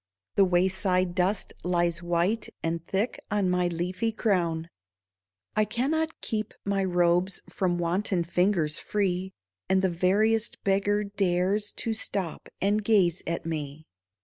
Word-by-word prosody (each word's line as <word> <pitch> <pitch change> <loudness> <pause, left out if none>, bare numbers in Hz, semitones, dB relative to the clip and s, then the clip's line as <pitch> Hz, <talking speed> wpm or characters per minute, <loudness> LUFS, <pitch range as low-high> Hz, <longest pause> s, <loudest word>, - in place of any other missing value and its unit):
The 200 - +5
wayside 185 0 +2
dust 185 +3 0
lies 175 -1 +1
white 175 +6 0
And 165 0 -1
thick 200 +6 -1
on 200 -3 +1
my 180 0 +2
leafy 180 +6 -1
crown. 170 -7 0 0.9
I 215 - +4
cannot 295 +9 -1
keep 215 -1 -3
my 200 -1 +1
robes 175 0 +2
From 180 -2 0
wanton 175 +1 0
fingers 170 -3 +1
free, 190 -2 -1 0.4
And 190 0 +3
the 190 - +3
veriest 210 +6 +1
beggar 200 +1 +2
dares 200 0 0
To 225 - -2
stop 195 -6 -3
and 205 +2 +1
gaze 190 -5 +3
at 170 -1 -2
me. 155 -2 -4
185 Hz, 130 wpm, -27 LUFS, 175-205 Hz, 0.9 s, The